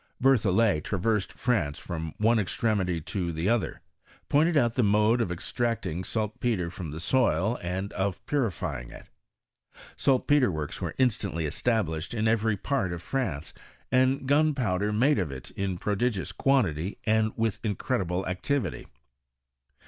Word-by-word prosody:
Berthoilet 110 - +3
traversed 105 +1 0
France 95 - 0
from 80 -3 -5
one 115 +2 +3
extre 110 +2 0
mity 90 -4 -1
to 90 -4 -2
the 80 +3 -2
other; 115 +1 0 0.5
pointed 155 +3 +3
out 120 -5 +3
the 125 - +1
mode 105 +2 +3
of 95 - -1
extract* 115 +6 -2
ing 85 +4 -3
saltpetre 105 -4 -1
from 85 -2 -6
the 75 +2 -6
soil, 110 +1 +2
and 95 +3 -3
of 95 -2 -2
purifying 90 - -2
it. - - -13 0.9
Saltpetre 135 0 +3
works 75 -4 -4
were - - -3
inataotly 100 -10 0
established 85 0 -1
in 110 0 +1
every 110 -1 +2
part 115 -4 -1
of 85 -1 -5
France, 90 - -3 0.4
and 130 +1 +2
gunpowder 130 -10 +2
made 120 +5 +3
of 85 -7 -1
it 65 0 -8
in 95 -2 -2
pro 105 +3 -1
digious 110 -3 -1
quantity, 100 - +1
and 110 0 +2
with 115 -3 -1
incredihle 95 -4 -1
activity. 95 - -2
105 Hz, 145 wpm, -27 LUFS, 90-120 Hz, 0.9 s, Berthoilet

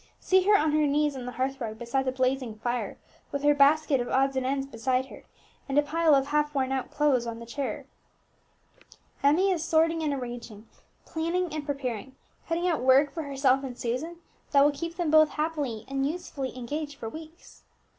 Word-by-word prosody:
See 375 0 +3
her 415 0 +7
on 310 -3 +1
her 305 0 +3
knees 295 0 +1
on 250 -2 -6
the 250 - -5
hearth 265 +2 -2
rug 220 -2 -4
beside 245 +3 -1
the 260 - +1
blazing 255 -3 -1
fire, 240 +2 -3 0.3
with 280 0 -3
her 295 0 +5
basket 290 -1 +4
of 245 - -4
odds 270 +1 +2
and 260 -1 0
ends 270 0 -1
beside 255 0 -1
her, - - -13 0.4
and 275 - 0
a 295 - +6
pile 315 0 +3
of 270 -1 +2
half 295 0 0
worn 265 -1 0
out 265 -1 -2
clothes 280 -5 +2
placed - - -6
on 230 0 -5
a 235 - -9
chair. 275 +4 -4 1.4
Emmie 325 +8 +4
is 335 -4 -1
sorting 325 0 +2
and 305 -2 0
arranging, 240 -5 -6 0.4
planning 335 +1 -2
and 305 -1 -5
preparing, 265 -3 -4 0.3
cutting 340 +2 0
out 330 -7 0
work 265 +3 +4
for 330 - -3
herself 275 -2 +1
and 250 -2 -6
Susan 255 +9 -3 0.4
that 280 -1 +7
will 295 - +4
keep 335 +4 -6
them 340 -3 -1
both 310 -1 +6
happily 295 -8 -3
and 275 0 -1
usefully 295 -6 -5
engaged 290 +4 -4
for 230 - -7
weeks. 315 +7 -11
280 Hz, 200 wpm, -27 LUFS, 255-310 Hz, 1.4 s, her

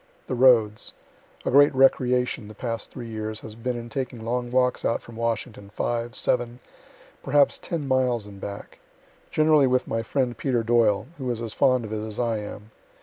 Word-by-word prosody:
The - - -4
roads 120 -4 +4 0.5
A - - 0
great 145 +1 +6
recreation, 125 -3 +2
the 105 - -11
past 115 0 -4
three 120 - -8
years, 110 -1 -5
has 110 - -9
been 120 +2 -3
in 120 0 -7
taking 120 -2 -5
long 120 +1 -2
walks 125 0 +1
out 115 - +1
from 115 - -13
Washington, 115 -2 -3
five, 120 +3 -3
seven, 120 -1 -1 0.6
perhaps 140 +1 +3
ten 160 -5 -4
miles 125 -4 +1
and 100 -1 -12
back; 100 0 -8 0.5
generally 155 -3 +4
with 130 0 +1
my 115 - -1
friend 125 +1 -1
Peter 120 -1 0
Doyle, 110 -3 +3
who 130 -2 -3
is 120 -2 -2
as 115 -2 -5
fond 130 -3 +2
of 110 - -6
it 110 0 -3
as 110 -1 -6
I 115 -3 0
am. 105 +1 -9
120 Hz, 185 wpm, -25 LUFS, 110-130 Hz, 0.6 s, great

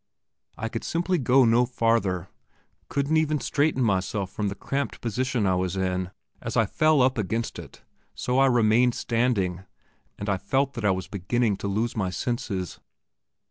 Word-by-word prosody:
I 115 - -3
could 115 0 -5
simply 175 +1 0
go 130 0 +4
no 120 +2 +4
farther, 115 -7 +1 0.6
couldn't 140 +3 +1
even 155 -1 +1
straighten 145 -2 +1
myself 100 -2 0
from 105 0 -2
the 100 - -3
cramped 140 +7 -3
position 120 0 -1
I 95 - +3
was 90 +1 -1
in. 90 -1 -1 0.3
As - - -3
I - - +4
fell 155 -4 +3
up 130 -2 +2
against 110 +3 -2
it, - - -12 0.3
so 125 +1 0
I 135 - +6
remained 120 0 +3
standing, 105 -7 0 0.5
and 100 - -6
I 100 -2 +1
felt 135 +7 0
that 115 - -4
I - - +4
was 95 0 -1
beginning 105 +3 0
to 100 - -4
lose 110 +4 -1
my 95 -5 0
senses. 95 -3 -3
115 Hz, 170 wpm, -26 LUFS, 95-130 Hz, 0.6 s, I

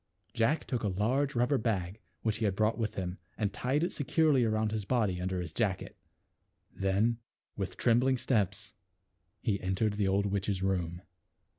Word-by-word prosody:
Jack 115 +8 +1
took 125 -3 -2
a 105 - 0
large 125 +9 +1
rubber 125 +3 +2
bag 100 -3 -1 0.2
which 110 -1 +1
he 110 - 0
had 100 -2 +1
brought 110 +2 +2
with 110 -2 -1
him 90 0 -4 0.2
and 105 -2 -1
tied 135 +8 0
it 175 - -1
securely 145 -1 +3
around 110 -1 +1
his 110 -1 -2
body 100 -5 +1
under 95 0 -1
his 85 -3 -5
jacket; 100 -3 -1 0.8
then 100 +5 +1 0.4
with 95 -2 -4
trembling 125 +2 +3
steps 105 -3 0 0.7
he 100 -3 0
entered 95 +3 0
the 105 -1 0
old 100 +1 +2
witch's 100 -1 -1
room. 90 -2 -1
105 Hz, 165 wpm, -31 LUFS, 95-120 Hz, 0.8 s, securely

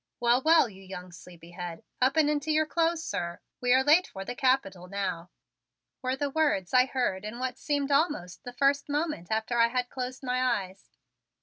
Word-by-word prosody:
"Well, 240 +1 +3
well, 320 -2 +5
you 195 -3 -13
young 185 -1 -9
sleepyhead, 175 0 -9 0.2
up 265 +4 +3
and 310 -2 +5
into 300 +1 0
your 310 0 +3
clothes, 330 +1 0
sir. 170 - -4 0.2
We 245 0 +1
are 260 +1 +5
late 315 +6 +5
for 195 0 -8
the - - -4
Capitol 245 -9 0
now," 185 -3 -3 0.7
were 255 0 -1
the 285 +1 -2
words 280 - 0
I 255 0 +5
heard 245 -8 -1
in 215 +3 -6
what 255 0 -3
seemed 285 -1 -1
almost 280 - 0
the 245 - -7
first 280 +2 +1
moment 295 - -2
after 220 +2 -1
I 230 - +6
had 250 +1 -2
closed 255 +1 -5
my 250 0 0 0.2
eyes. 190 +1 -16
250 Hz, 190 wpm, -28 LUFS, 190-285 Hz, 0.7 s, I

